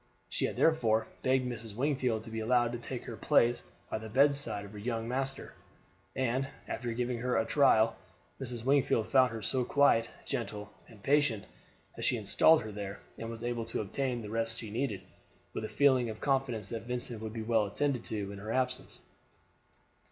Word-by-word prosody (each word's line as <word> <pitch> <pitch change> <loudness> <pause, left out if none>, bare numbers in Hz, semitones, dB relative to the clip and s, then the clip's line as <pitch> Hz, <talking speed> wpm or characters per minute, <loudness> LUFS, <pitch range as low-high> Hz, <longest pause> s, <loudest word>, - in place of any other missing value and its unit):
She - - 0
had - - -3
therefore 115 -9 +3 0.2
begged 130 0 +2
Mrs. 115 -3 -6
Wingfield 125 -4 0
to 115 - -10
be 115 - -3
allowed 120 +1 +2
to 120 - -4
take 120 +1 -6
her 115 - -6
place 120 +3 +3 0.3
by - - -3
the 110 0 -8
bedside 135 -4 +2
of 100 - -11
her 105 - -9
young 115 +1 -2
master, 135 +2 -2 0.6
and, 130 +1 0 0.2
after 120 0 -3
giving 120 +1 -1
her 125 +1 0
a 115 - +2
trial, 115 -6 +4 0.5
Mrs. 120 -3 -5
Wingfield 130 -5 +3
found 130 -2 +5
her 115 -2 -6
so 125 +4 0
quiet, 130 -4 +4 0.2
gentle, 105 -1 -4 0.2
and 110 -4 -16
patient 140 -8 +2 0.5
that - - -6
she - - +2
installed 160 -5 +5
her 110 - -6
there, 100 -1 -6 0.2
and 115 - -4
was 115 0 -7
able 120 -1 -2
to 115 - -2
obtain 120 +3 -2
the 105 - -7
rest 115 0 0
she 110 -3 -6
needed, 110 -5 -2 0.5
with 110 - -3
a - - -5
feeling 130 -4 +4
of 110 - -6
confidence 130 -7 0
that 115 -1 -4
Vincent 120 -2 -4
would 110 -1 -5
be 115 -1 -4
well 110 -2 +2
attended 135 +3 -1
to 100 -2 -3
in 100 - -8
her 105 +2 -5
absence. 125 +1 -1
115 Hz, 190 wpm, -31 LUFS, 110-130 Hz, 0.6 s, found